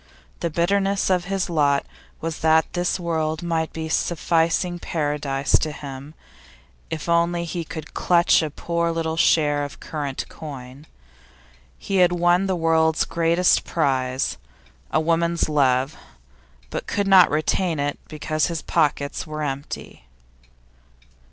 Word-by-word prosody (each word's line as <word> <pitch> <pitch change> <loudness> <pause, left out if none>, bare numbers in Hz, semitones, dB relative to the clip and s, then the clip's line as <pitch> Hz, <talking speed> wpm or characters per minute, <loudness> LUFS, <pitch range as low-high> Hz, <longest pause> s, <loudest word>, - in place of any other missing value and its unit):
The 170 - -1
bitterness 195 +4 +1
of 180 -1 +1
his 195 0 -1
lot 145 -4 +2 0.4
was 165 -1 -4
that 160 0 +3
this 175 +1 0
world 160 -1 -2
might 165 -2 -1
be 160 0 -5
a - - -6
sufficing 170 +2 +1
paradise 145 -4 0
to 155 - -2
him 140 +1 -9 0.7
if 160 0 -5
only 170 0 +2
he 170 0 -4
could 160 0 -8
clutch 175 -1 +4
a 155 - -2
poor 170 +3 -2
little 165 -1 -2
share 150 -3 +3
of 145 - -7
current 145 -4 -4
coin. 140 -1 -10 0.9
He 195 - -2
had 180 -1 +5
won 175 +2 +3
the 190 - 0
world's 160 -1 +2
greatest 170 +2 +2
prize 130 -4 0 0.5
a - - +2
woman's 170 +1 +1
love 135 -1 +2 0.8
but - - -4
could 200 -1 -1
not 190 -2 +7
retain 160 +3 0
it 145 0 -2
because 155 0 -1
his 170 -2 -4
pockets 150 -2 0
were 155 0 -4
empty. 140 0 -6
160 Hz, 135 wpm, -23 LUFS, 150-170 Hz, 0.9 s, not